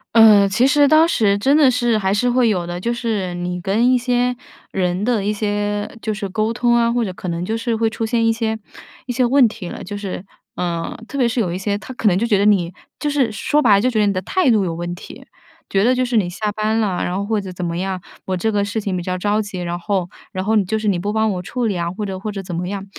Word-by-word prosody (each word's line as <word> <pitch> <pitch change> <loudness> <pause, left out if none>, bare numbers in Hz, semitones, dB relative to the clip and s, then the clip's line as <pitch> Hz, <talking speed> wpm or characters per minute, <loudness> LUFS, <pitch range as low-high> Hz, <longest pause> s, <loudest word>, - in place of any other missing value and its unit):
呃， 215 -3 +7
其 235 +7 +3
实 290 0 +4
当 315 +2 +5
时 210 -10 +2
真 275 +8 +3
的 275 -4 +5
是 240 -2 +1
还 195 -2 0
是 245 +5 +1
会 245 -1 +3
有 180 -5 0
的。 175 0 -4
就 235 +5 -1
是 215 -7 -2
你 180 0 -3
跟 220 +8 +2
一 255 - +4
些 245 0 0 0.4
人 180 0 -1
的 225 -3 0
一 210 - +1
些 205 0 -2
就 215 - -1
是 200 -2 -4
沟 215 +3 -1
通 240 0 +2
啊， 235 0 +3
或 240 0 +1
者 195 - -3
可 180 0 -6
能 170 +1 -2
就 220 +4 -2
是 230 0 -1
会 225 0 +1
出 225 +1 -3
现 230 0 +1
一 225 - +4
些 225 -1 -1 0.5
一 - - -2
些 250 +1 +2
问 255 0 +5
题 210 -5 -7
了。 - - -7
就 205 +2 -6
是， 195 -2 -5 0.3
呃， 170 -2 -3
特 280 - -6
别 250 - +3
是 235 +1 -1
有 190 -7 0
一 180 - -3
些， 200 +1 -1
他 260 +3 -9
可 220 - 0
能 180 - +4
就 220 +5 0
觉 210 -4 +3
得 200 - +2
你 185 -5 +3 0.3
就 295 - -1
是 270 -6 +1
说 290 +8 0
白 230 -8 +5
了 200 - +3
就 255 - +2
觉 225 -4 0
得 210 - +4
你 200 - +2
的 185 - -2
态 340 - +2
度 215 -3 +3
有 170 -3 -2
问 175 +1 -4
题。 175 - -11 0.4
觉 195 0 +2
得 250 +2 +3
就 255 0 +1
是 240 -2 0
你 180 -4 +1
下 210 +4 -3
班 215 +1 0
了， 195 -5 0
然 180 - -2
后 200 - -2
或 215 -1 0
者 190 - -7
怎 180 0 -5
么 170 0 -2
样， 190 0 -2 0.3
我 185 -1 -1
这 220 +5 0
个 205 -1 +1
事 205 +2 -2
情 200 -3 -2
比 180 - -2
较 185 +1 -3
着 205 +3 +1
急， 200 -3 -6
然 175 0 -3
后 185 -1 -1 0.2
然 185 +1 -4
后 220 +1 +2
你 210 - +4
就 220 +4 -1
是 215 -1 -3
你 185 -4 +2
不 205 +4 -2
帮 220 -1 +1
我 180 -1 -3
处 245 +6 -3
理 210 -4 0
啊， 170 - -1
或 210 +2 -4
者 190 -1 -5
或 210 +2 -4
者 195 -1 -6
怎 180 - -7
么 180 +1 -3
样。 195 0 -4
210 Hz, 315 characters per minute, -20 LUFS, 185-235 Hz, 0.5 s, 呃